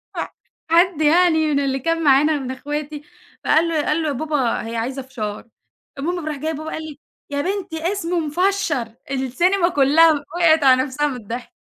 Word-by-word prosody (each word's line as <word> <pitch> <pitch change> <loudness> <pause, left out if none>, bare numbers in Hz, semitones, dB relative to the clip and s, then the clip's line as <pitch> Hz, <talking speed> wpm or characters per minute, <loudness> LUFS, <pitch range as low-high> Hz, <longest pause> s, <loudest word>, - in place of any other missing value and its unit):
ف - - -4 0.5
حد 340 -2 +3
يعني 320 0 +4
من 280 - +2
اللي 270 -1 -1
كان 330 +4 -1
معانا 290 +2 +4
من 260 -1 -5
أخواتي 295 +2 -5 0.4
فقال 325 +2 +3
له 315 -3 -1
قال 315 +2 +1
له: - - -1
"يا 290 - -1
بابا 280 -3 -1
هي 230 - -5
عايزة 255 +4 -3
فشار" 220 -4 -6 0.5
المهم 345 +3 -3
فراح 310 -1 -3
جاي 315 +3 -3
بابا 310 +1 -6
قال 315 - -5
لي: 305 -2 -9 0.3
"يا 285 0 -2
بنتي 360 -1 -3
اسمه 355 -3 -2
مِفشّر" 310 - -1 0.2
السينما 345 +8 +1
كلّها 310 +2 +5
وقعِت 315 +1 +2
على 260 -1 +5
نَفسها 295 +2 -1
من 270 - -4
الضحك. 240 - -7
300 Hz, 180 wpm, -20 LUFS, 270-330 Hz, 0.5 s, كلّها